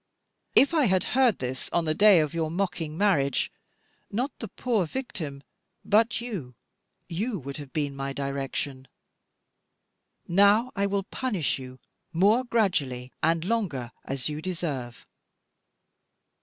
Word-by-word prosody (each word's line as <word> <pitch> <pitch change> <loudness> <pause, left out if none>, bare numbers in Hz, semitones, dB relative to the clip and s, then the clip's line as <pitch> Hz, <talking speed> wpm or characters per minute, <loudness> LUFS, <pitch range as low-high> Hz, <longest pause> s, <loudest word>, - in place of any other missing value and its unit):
If 280 +5 +6
I 310 -4 +4
had 185 -4 +3
heard 255 -5 +4
this 125 0 -4
on 170 - +1
the 155 - +2
day 200 -1 +7
of 150 -2 -2
your 165 -2 -1
mocking 170 -3 -2
marriage, 150 -10 +2 0.6
not 250 +7 -1
the 225 - -4
poor 215 -3 0
victim 155 - -5 0.4
but 220 +2 +3
you, 190 - -6 0.5
you, 200 +6 -2
would 140 -3 -7
have 145 -3 -9
been 145 -2 -2
my 135 0 -3
direction. 135 -1 -3 1.4
Now 200 +7 +5
I 200 0 +1
will 200 0 0
punish 200 - -1
you 130 0 -9 0.3
more 205 +9 +4
gradually, 150 - 0
and 165 +1 +2
longer, 175 - -1
as 135 -2 -3
you 150 0 -4
deserve. 150 -9 -4
170 Hz, 130 wpm, -27 LUFS, 140-210 Hz, 1.4 s, day